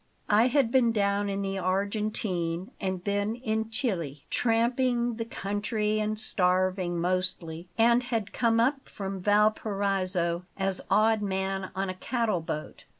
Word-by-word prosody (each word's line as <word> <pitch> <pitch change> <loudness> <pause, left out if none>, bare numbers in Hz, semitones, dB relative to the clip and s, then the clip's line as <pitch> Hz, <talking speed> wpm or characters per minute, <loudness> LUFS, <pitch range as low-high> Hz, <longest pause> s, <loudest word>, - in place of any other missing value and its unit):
I 220 +4 +5
had 255 -3 +2
been 245 -3 +4
down 200 -1 +1
in 200 0 -2
the 195 0 -2
Argentine, 190 -2 -1
and 185 -2 -2
then 205 +2 0
in 220 -2 -2
Chili, 170 - -3
tramping 240 0 +1
the 230 - -3
country 210 +1 -1
and 215 0 -1
starving, 185 -3 +1
mostly; 175 -1 -2
and 235 +2 +5
had 230 -4 -3
come 230 -2 +2
up 270 +4 +1
from 195 -1 -5
Valparaiso 195 -4 +1
as 195 -1 0
odd 215 +2 +4
man 190 -1 -2
on 195 +1 -1
a 185 - -3
cattle 215 -1 -1
boat. 155 -1 -6
205 Hz, 140 wpm, -28 LUFS, 185-225 Hz, -, I